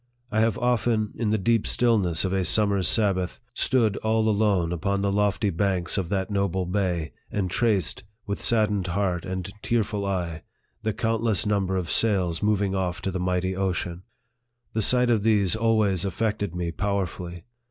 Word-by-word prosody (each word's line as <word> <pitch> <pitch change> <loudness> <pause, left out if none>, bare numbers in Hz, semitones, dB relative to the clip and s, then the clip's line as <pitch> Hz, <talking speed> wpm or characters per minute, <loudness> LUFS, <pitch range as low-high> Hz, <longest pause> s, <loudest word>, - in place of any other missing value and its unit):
I 110 - +1
have 110 -2 +2
often, 120 -3 +1
in 115 -3 -1
the 110 - +2
deep 115 +2 +1
stillness 100 -9 +2
of 95 - -1
a 95 -1 +1
summer's 100 -1 +3
Sabbath, 95 -4 +1
stood 115 -5 +1
all 110 0 +1
alone 100 -5 +2
upon 100 +3 -1
the 100 - +1
lofty 105 0 +1
banks 90 -1 0
of 95 -4 -2
that 95 +1 -1
noble 95 -2 0
bay, 90 -4 -1 0.2
and 95 -3 -2
traced, 105 -3 0 0.2
with 100 -1 -4
saddened 105 -5 +2
heart 90 -1 -1
and 95 -1 -4
tearful 105 -3 -1
eye, 90 -5 -2 0.4
the 110 -1 -1
countless 115 -1 0
number 95 -2 0
of 85 -4 -3
sails 95 -7 +1
moving 105 -2 +1
off 90 -3 -1
to 95 - -1
the 95 - -3
mighty 90 +1 -1
ocean. 90 -2 -2 0.7
The 110 - 0
sight 125 +3 +3
of 110 -3 +2
these 105 -3 +2
always 110 -5 +2
affected 100 -2 -2
me 85 -1 -2
powerfully. 90 -3 -3
100 Hz, 165 wpm, -25 LUFS, 90-110 Hz, 0.7 s, summer's